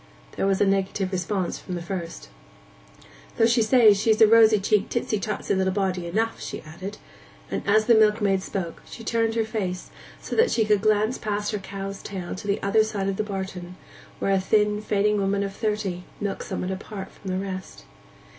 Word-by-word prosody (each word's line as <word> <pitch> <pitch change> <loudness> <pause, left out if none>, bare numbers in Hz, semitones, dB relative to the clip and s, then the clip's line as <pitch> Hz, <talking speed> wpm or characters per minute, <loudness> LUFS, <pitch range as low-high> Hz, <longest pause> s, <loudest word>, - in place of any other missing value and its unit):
There - - -1
was 195 -1 +2
a - - +4
negative 195 0 0
response 185 0 -2
from 180 - -6
the 175 - -4
first. 170 - -6 1.1
'Though - - +3
they 230 +1 +4
say 220 -1 +6
she's 215 +2 +2
a 220 - +9
rosy 220 0 +6
cheeked, 205 +1 +1
tisty 230 -3 -1
tosty 210 0 -2
little 190 0 +1
body 185 -3 -1
enough,' 225 +6 -1
she - - -6
added; 185 +6 -8 0.5
and - - -1
as 215 +2 +4
the 235 - +5
milkmaid 210 -3 +3
spoke 185 -3 -5
she 230 - -11
turned 225 0 0
her 225 -1 +1
face 195 -5 -4 0.3
so - - -5
that 460 +2 +4
she 220 - +2
could 210 -2 +3
glance 215 +2 +2
past 210 -1 -2
her 210 - -2
cow's 195 0 -6
tail 185 -3 -6
to 195 - -7
the 200 - +1
other 215 +2 +4
side 200 -3 -2
of 195 - -3
the - - 0
barton, 190 -3 -6 0.4
where 195 - 0
a 195 - +3
thin, 210 +2 +2
fading 210 0 +1
woman 200 +1 +1
of 195 -1 -5
thirty 210 -5 -2 0.2
milked 205 -2 -3
somewhat 185 - -3
apart 195 +1 -6
from 195 - -9
the 185 - -1
rest. 190 -1 -6
200 Hz, 195 wpm, -25 LUFS, 190-215 Hz, 1.1 s, a